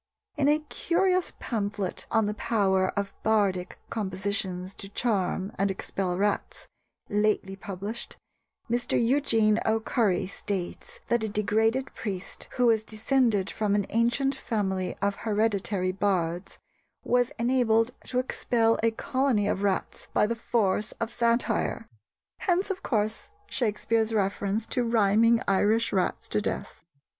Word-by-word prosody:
In 280 Hz, -, +2 dB
a 300 Hz, -, +5 dB
curious 365 Hz, +4 st, 0 dB
pamphlet 205 Hz, -4 st, -3 dB
on 225 Hz, -1 st, +2 dB
the 210 Hz, -, -1 dB
power 195 Hz, -4 st, +1 dB
of 200 Hz, -1 st, -2 dB
bardic 200 Hz, -5 st, +1 dB
compositions 190 Hz, -2 st, -2 dB
to 195 Hz, -, -9 dB
charm 195 Hz, -3 st, -1 dB
and 200 Hz, 0 st, +2 dB
expel 190 Hz, -1 st, -2 dB
rats, 205 Hz, +1 st, -1 dB, 0.4 s
lately 205 Hz, -2 st, +1 dB
published, 200 Hz, +4 st, -6 dB, 0.5 s
Mr. 240 Hz, 0 st, 0 dB
Eugene 230 Hz, -4 st, +3 dB
O'Curry 220 Hz, -3 st, +1 dB
states 190 Hz, -1 st, -5 dB
that 235 Hz, -1 st, +2 dB
a 220 Hz, -, -1 dB
degraded 220 Hz, +5 st, +1 dB
priest, 195 Hz, -4 st, -5 dB
who 250 Hz, -, +2 dB
was 225 Hz, -2 st, +4 dB
descended 220 Hz, -2 st, +1 dB
from 210 Hz, -2 st, 0 dB
an 205 Hz, -2 st, +1 dB
ancient 240 Hz, +5 st, +2 dB
family 195 Hz, -8 st, -2 dB
of 200 Hz, 0 st, +1 dB
hereditary 205 Hz, -3 st, 0 dB
bards, 180 Hz, -2 st, -1 dB, 0.5 s
was 245 Hz, 0 st, +2 dB
enabled 235 Hz, -1 st, +2 dB
to 250 Hz, -, -3 dB
expel 230 Hz, -2 st, +1 dB
a 230 Hz, -, +4 dB
colony 240 Hz, -2 st, 0 dB
of 195 Hz, -, 0 dB
rats 200 Hz, -2 st, -1 dB
by -, -, +5 dB
the 230 Hz, +2 st, -1 dB
force 215 Hz, -2 st, 0 dB
of 230 Hz, +1 st, -4 dB
satire!" 235 Hz, 0 st, 0 dB, 0.5 s
Hence, 375 Hz, +2 st, +1 dB
of 380 Hz, 0 st, -4 dB
course, 215 Hz, -2 st, -1 dB, 0.2 s
Shakespeare's 225 Hz, -, 0 dB
reference 200 Hz, +1 st, 0 dB
to 250 Hz, 0 st, 0 dB
rhyming 230 Hz, 0 st, +4 dB
Irish 210 Hz, +4 st, +2 dB
rats 190 Hz, -2 st, 0 dB
to 210 Hz, -, +1 dB
death. -, -, -4 dB
215 Hz, 130 wpm, -27 LUFS, 200-235 Hz, 0.5 s, a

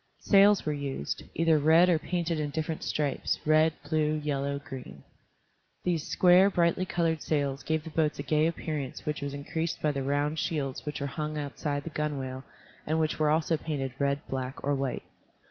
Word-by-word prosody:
Sails 200 Hz, -1 st, +5 dB
were 150 Hz, -, 0 dB
used, 140 Hz, -, -4 dB
either 165 Hz, -2 st, +3 dB
red 160 Hz, +4 st, +6 dB
or 170 Hz, -3 st, +3 dB
painted 170 Hz, -1 st, -2 dB
in 150 Hz, -1 st, -1 dB
different 160 Hz, +1 st, -3 dB
stripes, 145 Hz, -3 st, -1 dB
red, 155 Hz, +1 st, +5 dB, 0.2 s
blue, 155 Hz, 0 st, +1 dB
yellow, 140 Hz, -2 st, -1 dB
green. 125 Hz, -, -9 dB, 0.8 s
These 170 Hz, -4 st, -1 dB
square, 185 Hz, +2 st, +6 dB
brightly 180 Hz, 0 st, +1 dB
colored 165 Hz, -3 st, 0 dB
sails 140 Hz, -2 st, -1 dB
gave 160 Hz, -1 st, -1 dB
the 160 Hz, -, -8 dB
boats 155 Hz, -1 st, +1 dB
a -, -, -4 dB
gay 155 Hz, 0 st, +2 dB
appearance 155 Hz, -5 st, -4 dB
which 150 Hz, -1 st, -2 dB
was 140 Hz, 0 st, -4 dB
increased 160 Hz, +3 st, -3 dB
by 150 Hz, -, +1 dB
the 140 Hz, -1 st, -3 dB
round 145 Hz, +3 st, 0 dB
shields 140 Hz, -4 st, -2 dB
which 150 Hz, -, -4 dB
were -, -, -1 dB
hung 150 Hz, +2 st, -3 dB
outside 145 Hz, 0 st, -3 dB
the 165 Hz, -, -6 dB
gunwale 135 Hz, -4 st, -3 dB, 0.4 s
and 160 Hz, +1 st, +1 dB
which 155 Hz, -1 st, 0 dB
were 155 Hz, -1 st, +3 dB
also 160 Hz, +1 st, +2 dB
painted 140 Hz, -5 st, -3 dB
red, 140 Hz, 0 st, 0 dB
black, 130 Hz, 0 st, -4 dB
or 145 Hz, -, +1 dB
white. 135 Hz, -2 st, -2 dB
150 Hz, 180 wpm, -29 LUFS, 140-160 Hz, 0.8 s, red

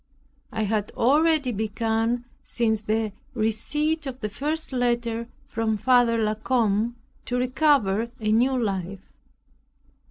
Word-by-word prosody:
It 220 Hz, 0 st, -1 dB
had 210 Hz, 0 st, -1 dB
already 295 Hz, +1 st, +3 dB
begun 225 Hz, +2 st, -1 dB, 0.2 s
since 220 Hz, -2 st, 0 dB
the 215 Hz, 0 st, -1 dB, 0.2 s
receipt 285 Hz, +8 st, 0 dB
of 260 Hz, -1 st, -6 dB
the 210 Hz, -, -3 dB
first 300 Hz, +7 st, -3 dB
letter 235 Hz, -2 st, 0 dB, 0.2 s
from 225 Hz, -4 st, -1 dB
Father 245 Hz, 0 st, +4 dB
La 215 Hz, -1 st, +1 dB
Combe, 220 Hz, 0 st, +1 dB, 0.3 s
to 245 Hz, -, -1 dB
recover 250 Hz, -5 st, +2 dB
a 215 Hz, -1 st, 0 dB
new 255 Hz, +4 st, +3 dB
life. 195 Hz, -3 st, -3 dB
230 Hz, 120 wpm, -25 LUFS, 215-255 Hz, 0.3 s, Father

